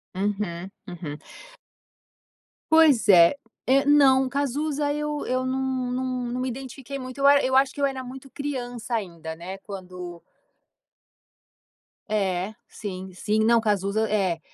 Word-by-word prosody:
Uhum, 195 -2 -2 0.2
uhum. 165 -5 -6 1.5
Pois 315 -8 +6
é. 170 +5 +7 0.3
Eh, 275 +2 +4
não, 275 -2 +5
o - - -3
Cazuza, 285 +2 -1
eu 300 0 -3
eu 255 0 0
não 260 -1 -1
não 255 +1 -1 0.3
não 250 - -2
me 255 - -1
identifiquei 270 +2 -7
muito. 255 +1 -8
Eu 275 - +4
a 285 0 +7
eu 260 0 0
acho 265 0 +4
que - - -10
eu 280 - +4
era 265 -1 -2
muito 265 +2 -10
criança 245 -5 -4
ainda, 170 -6 -5
né. 180 +3 -7
Quando 180 -3 -8 1.9
É 195 -1 0
sim, 190 -2 -7
sim, 210 +4 0
não, 230 +1 +4
Cazuza 210 +1 0
é 190 -5 +1
245 Hz, 140 wpm, -25 LUFS, 190-270 Hz, 1.9 s, é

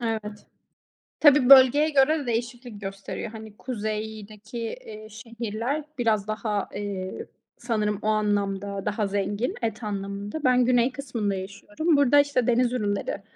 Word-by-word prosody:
Evet. 215 -3 -4 0.7
Tabii, 290 -4 +6
bölgeye 275 +3 +8
göre 300 +2 +3
de 285 - -6
değişiklik 240 -2 -4
gösteriyor. 195 +2 -6
Hani, 220 -2 -11
kuzeydeki, 215 -1 -5
eee, 215 -1 -7
şehirler 230 +5 -4
biraz 220 -4 +1
daha, 215 -1 -2
eee, 195 -2 -5 0.3
sanırım 215 -4 -1
o 215 - -3
anlamda 200 -2 -1
daha 210 0 -1
zengin. 205 +4 -2
Et 225 -1 -3
anlamında. 200 +5 -5
Ben 250 -2 +4
güney 245 0 +3
kısmında 240 -7 -3
yaşıyorum. 205 - -1
Burada, 285 0 +5
işte, 285 -4 +2
deniz 245 0 +2
ürünleri 205 -6 -2
220 Hz, 130 wpm, -25 LUFS, 205-250 Hz, 0.7 s, bölgeye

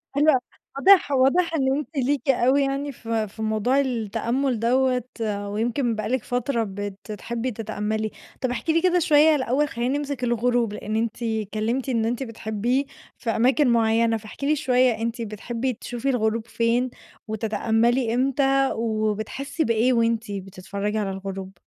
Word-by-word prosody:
حلو 295 +2 +4
أ 260 - +3 0.4
واضح 375 -2 +6
واضح 280 +6 +3
إن 270 -3 +2
أنتِ 300 - -4
ليكِ 275 +2 0
أوي 265 +2 +4
يعني 275 +1 -2
في 225 -3 -2
في 210 +2 -11
موضوع 220 +5 +1
التأمُّل 240 0 -1
دوَّة، 250 +1 +2 0.4
ويمكن 230 +3 -1
بقى 215 - -3
لِك 255 -2 0
فترة 245 -1 -1
بتحبي 205 +5 -5
تتأمّلي، 215 0 -3 0.3
طب 255 - 0
احكي 315 +6 -1
لي 330 - +3
كده 360 -1 +3
شوية 310 -1 +5
الأول 270 +2 +1
خلّينا 245 +2 -1
نمسك 285 -3 -4
الغروب، 240 -2 +1
لإن 210 +1 -4
أنتِ 230 +1 -2
اتكلّمتِ 220 +3 -2
إن 230 -3 +1
أنتِ 240 +3 -1
بتحبيه 230 +3 -1 0.3
في 235 - -4
أماكن 255 +5 +3
معيّنة، 230 0 +3
فاحكي 220 +6 -8
لي 305 - +3
شوية 255 -3 +3
أنتِ 230 +1 -2
بتحبي 230 +4 -3
تشوفي 245 +3 -4
الغروب 225 -2 0
فين؟ 235 +2 +1 0.4
وتتأمّلي 225 +2 +1
إمتى؟ 270 +1 +2
وبتحسّي 220 +7 -2
بإيه 230 +1 +2
وأنتِ 230 -2 +1
بتتفرّجي 200 +2 -4
على 205 -2 -1
الغروب؟ 195 -1 -6
235 Hz, 150 wpm, -24 LUFS, 220-265 Hz, 0.4 s, واضح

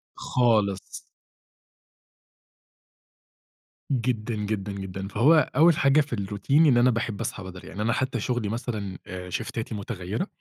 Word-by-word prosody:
خالص. 105 -6 0 2.9
جدًا، 120 -2 -1
جدًا، 105 -1 -3
جدًا، 95 0 -5
فهو 150 +10 +4
أول 160 +1 +6
حاجة 150 -2 +4
في 140 -5 -2
الRoutine 100 +3 -6 0.2
إن 130 -4 +5
أنا 125 +1 +5
باحب 115 -2 -2
أصحى 105 -3 -4
بدري 95 -1 -9
يعني، 100 +3 -5
أنا 115 +1 +1
حتى 130 -2 -1
شغلي 120 -2 -1
مثلًا 105 -4 -4 0.3
شيفتاتي 115 +3 -4
متغيِّرة 100 - -4
110 Hz, 120 wpm, -26 LUFS, 100-125 Hz, 2.9 s, أول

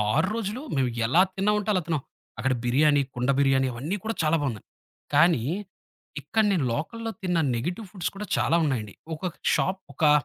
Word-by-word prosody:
6 - - +3
రోజులు 230 +2 -3 0.2
మేము 130 -2 +2 0.2
ఎలా 160 +10 +5
తిన్నామంటే 210 +1 +1
అలా 185 - +2
తిన్నాం. 160 -4 0 0.4
అక్కడ 130 +2 +1
బిర్యానీ, 145 +4 +4
కుండ 125 +2 -1
బిర్యానీ 135 -1 +3
అవన్నీ 150 - -3
కూడా 225 +1 -2
చాలా 155 +1 +3
బావున్నాయి. 120 -8 -3 0.5
కానీ, 150 -4 +5 0.8
ఇక్కడ 190 - +1
నేను 170 -9 +1
లోకల్‌లో 225 - -3
తిన్న 180 -2 +1 0.2
నెగీటివ్ 175 - -3
ఫుడ్స్ 185 -5 -2
కూడా 210 +1 -6
చాలా 165 - +2
ఉన్నాయండి. 110 -8 -2 0.2
ఒకొక 175 +2 -4 0.2
షాప్, 190 0 0
ఒకా 150 +2 +3
160 Hz, 165 wpm, -26 LUFS, 135-195 Hz, 0.8 s, ఎలా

